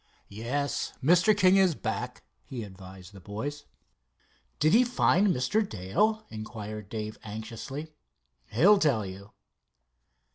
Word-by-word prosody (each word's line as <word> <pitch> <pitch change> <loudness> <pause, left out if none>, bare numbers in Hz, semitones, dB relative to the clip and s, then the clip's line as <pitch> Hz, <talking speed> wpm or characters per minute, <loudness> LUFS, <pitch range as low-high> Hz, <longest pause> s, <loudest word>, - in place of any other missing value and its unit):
"Yes, 125 +8 -2
Mr. 180 - +5
King 190 -1 +5
is 185 -4 +4
back," - - -4 0.2
he 125 -4 -6
advised 95 -1 -12
the 100 - -11
boys. 140 +10 -6 0.9
"Did 155 +4 +3
he 240 +3 +7
find 230 -5 +3
Mr. 175 - +2
Dale?" 210 - 0
inquired 110 -1 -7
Dave 110 -1 -5
anxiously. 115 +8 -7 0.5
"He'll 190 - +5
tell 135 - +2
you." 95 +2 -9
125 Hz, 115 wpm, -28 LUFS, -, 0.9 s, he